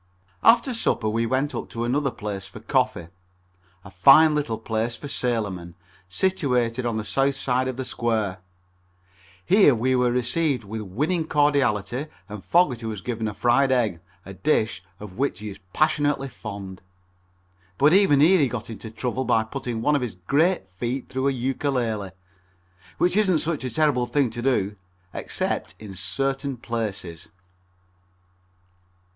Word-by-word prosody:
After 240 +3 +5
supper 120 - 0
we 115 +2 0
went 135 +4 0
up - - -5
to 115 - -4
another 135 +4 +1
place 105 -5 -6
for 95 - -11
coffee, 85 -1 0 0.8
a 95 - -11
fine 135 - +7
little 140 -7 -1
place 110 +1 -2
for 145 - -8
sailormen, 100 -10 -2 0.3
situated 125 - 0
on 115 -2 -1
the 110 - -2
south 135 +8 +1
side 130 -1 0
of 130 -1 -4
the 130 - -3
square. 110 -7 -1 1.1
Here 190 - +5
we 130 +3 +1
were 125 -1 +2
received 125 +2 0
with 110 +2 -6
winning 150 - -1
cordiality 140 -4 +1 0.2
and 105 -2 -8
Fogerty 130 -10 +2
was 105 -3 -5
given 115 0 -3
a 105 - -5
fried 130 +3 +3
egg, 110 -9 +1 0.3
a 95 - -8
dish 110 -5 0 0.2
of 105 +1 -10
which 140 -9 0
he 105 0 -6
is 95 - -10
passionately 145 -1 +1
fond. 100 -5 -8 1.0
But 145 +4 +5
even 185 -8 +5
here 180 +5 +6
he 140 - +3
got 120 -2 -5
into 110 +1 -8
trouble 125 +3 -3
by 115 -3 +2
putting 115 -1 -5
one 150 +3 +3
of 140 - +1
his 125 -6 -4
great 145 - +1
feet 120 +8 -4
through 130 +1 -1
a - - +3
Ukulele, 125 -5 -1 0.9
which 180 - +2
isn't 195 -5 +3
such 155 -1 -2
a 130 - -2
terrible 130 -3 +1
thing 140 -4 +1
to 120 +1 -5
do, 105 -6 0 0.4
except - - -3
in 105 -3 -10
certain 135 +8 -2
places. 105 -7 -5
125 Hz, 155 wpm, -24 LUFS, 110-140 Hz, 1.1 s, fine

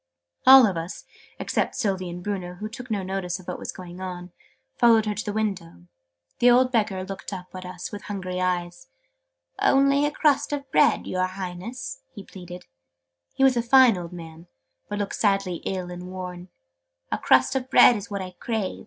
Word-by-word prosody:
All 265 -1 +10
of 190 -5 -1
us 165 +3 -6 0.3
(except - - -1
Sylvie 195 -7 -1
and 175 +1 -7
Bruno, 185 -3 -4
who 210 +4 -6
took 250 +3 -10
no 205 -3 -1
notice 185 -2 -3
of 185 - -15
what - - -5
was - - -5
going 180 -1 -10
on) 180 -1 -6 0.4
followed 230 -2 +5
her 210 - -1
to 210 +2 -4
the 210 - -3
window. 195 - -4 0.5
The 245 - +6
old 250 +1 +4
Beggar 210 -5 0
looked 195 +1 -7
up 185 -2 -8
at 185 0 -7
us 180 -1 -7
with 205 -1 -7
hungry 185 -3 -4
eyes. 175 - -2 0.7
"Only 275 +1 +4
a - - -2
crust 290 -1 +1
of 280 -2 -5
bread, 150 - +3
your 185 0 -1
Highness!" 190 - -7
he 200 - -8
pleaded. 180 -2 -10
{Image...'Drink - - -46
this!'} 85 0 -53
He 270 - +1
was 265 -2 +5
a - - +3
fine 245 -1 +6
old 175 -1 -7
man, 165 -1 -11 0.4
but 205 - -3
looked 205 -1 -3
sadly 195 -4 +1
ill 185 -2 -3
and 180 0 -8
worn. 180 -1 -7 0.6
"A - - -1
crust 130 - +3
of 260 -1 -2
bread 245 - +7
is 205 -2 -6
what 200 -2 -4
I 185 - -8
crave!" 220 -5 -3
190 Hz, 195 wpm, -25 LUFS, 180-225 Hz, 0.7 s, All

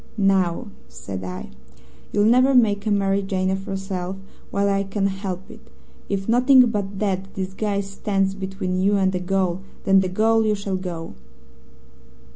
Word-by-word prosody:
'Now,' 190 -4 +1 0.2
said 65 +9 -7
I, 90 0 -6 0.6
'you'll 205 - +2
never 255 +4 +5
make 210 -4 +3
a - - +2
Mary 200 -1 +2
Jane 190 -1 -1
of 190 +1 -3
yourself 190 -2 -4 0.3
while 200 0 +1
I 195 0 +2
can 195 0 -2
help 190 -1 -4
it. - - -15 0.4
If 195 -1 -2
nothing 250 +2 +6
but 200 -2 -3
that 195 -1 -2
disguise 195 +1 -2
stands 195 -1 0
between 190 -1 -3
you 200 +2 +3
and 190 -1 +2
a 180 - -1
gaol, 185 0 0 0.2
then 195 -1 +5
to 190 - -1
gaol 225 +4 +3
you 215 -1 +2
shall 200 -1 -3
go.' 175 -3 -6
195 Hz, 160 wpm, -23 LUFS, 190-205 Hz, 0.6 s, nothing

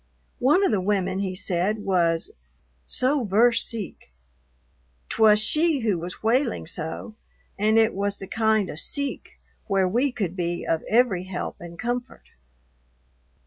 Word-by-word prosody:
One 295 +10 +4
of - - +2
the 205 -4 +1
women, 190 -1 0
he 190 -2 -2
said, 190 +3 -1
was 170 -3 +1 0.6
"so 265 +1 +2
ver' 225 +4 +4
seek," 225 - -4 1.0
't - - -4
was 210 -1 +7
she 305 +6 +1
who 210 -6 0
was 175 +5 -8
wailing 235 - +1
so, 160 +6 -5 0.4
and 215 +2 +2
it 225 0 +4
was 200 +1 -2
the 195 - -7
kind 220 -2 +1
of 150 - -4
"seek" 280 - -3 0.3
where 195 -1 +2
we 245 +9 +1
could 195 -7 -3
be 175 -1 -2
of 160 - 0
every 220 -6 +2
help 185 -1 -5
and 170 0 -9
comfort. 245 +2 -4
210 Hz, 145 wpm, -24 LUFS, 185-235 Hz, 1.0 s, was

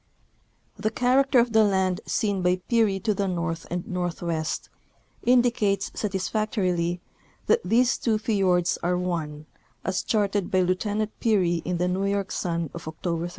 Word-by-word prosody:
The 215 - 0
character 255 +4 +2
of 235 -1 +3
the 220 0 +6
land 190 -3 +1
seen 205 -4 0
by 180 0 +3
Peary 220 -5 +2
to 215 +2 +1
the 200 0 -1
north 170 -2 -3
and 175 0 -4
northwest 170 -3 -2 0.5
indicates 235 -5 +2
satisfactorily 190 -3 -1 0.5
that 465 +1 +3
these 245 +2 +2
two 225 -3 +1
fiords 190 -5 +1
are 180 +1 +1
one, 160 -4 -3 0.4
as 190 -1 0
charted 205 -3 0
by 185 -3 +2
Lieutenant 205 +4 0
Peary 185 -7 +2
in 180 0 -1
the 180 +1 0
New 185 +2 0
York 200 -1 -1
Sun 170 -3 -2
of 170 -2 -8
October 165 +1 -3
31. - - -7
190 Hz, 150 wpm, -25 LUFS, 175-215 Hz, 0.5 s, the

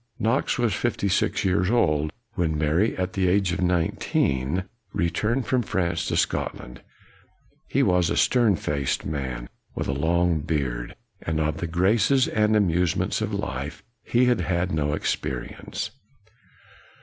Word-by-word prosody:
Knox 115 +5 +1
was 120 -4 +1
fifty 120 -4 -1
six 100 +1 +1
years 90 0 +2
old 75 -10 +2 0.2
when 80 -6 0
Mary, 80 +8 +1
at 90 0 -2
the 95 -2 +1
age 95 0 +2
of 90 - -2
nineteen, 85 -3 0 0.3
returned 105 +9 0
from 130 +1 +1
France 85 -5 -1
to - - 0
Scotland. 60 0 -2 0.9
He - - +2
was 90 -1 +3
a - - 0
stern 120 -6 +4
faced 70 -4 -2
man, 65 -5 -4 0.3
with - - -2
a 70 - 0
long 85 +3 +2
beard. 70 -6 -2 0.3
Of 80 -1 0
the 85 - -3
graces 100 +10 +3
and 105 0 +2
amusements 90 -4 +1
of - - -1
life 75 +10 -4 0.2
he 120 +1 +3
had 125 -6 +2
had 90 +1 0
no 75 -2 0
experience. - - -3
90 Hz, 140 wpm, -25 LUFS, 75-100 Hz, 0.9 s, stern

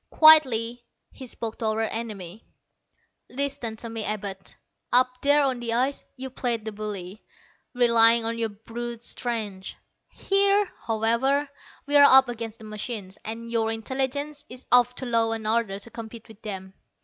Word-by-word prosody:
Quietly 245 -7 +6 0.3
he 260 - -10
spoke 230 -2 -5
to 230 - -3
our 220 0 0
enemy. 215 -4 -5 0.9
"Listen 275 -4 -2
to 230 - -7
me, 225 -1 -4
Abud. 200 -2 -4 0.4
Up 255 0 +3
there 290 +1 +4
on 260 -3 0
the 235 -1 -2
ice, 260 +4 0
you 265 0 -7
played 235 -3 -2
the 220 - -4
bully, 205 -2 -7 0.5
relying 235 -1 +5
on 230 +1 -1
your 225 -1 0
brute 230 +3 -7
strength. 215 -7 -4 0.3
Here, 400 0 +2 0.2
however, 235 +6 +1 0.4
we're 290 0 +5
up 265 -2 +7
against 230 -2 -6
the 220 - -13
machines, 210 -2 -6
and 230 +1 -6
your 225 -1 0
intelligence 270 +6 -3
is 250 +1 -11
of 245 0 +5
too 260 - -6
low 230 -2 +1
an 225 -1 -5
order 220 -3 0
to 215 +4 -9
compete 230 0 -9
with 220 -1 -16
them. 190 -3 -6
230 Hz, 155 wpm, -25 LUFS, 220-255 Hz, 0.9 s, up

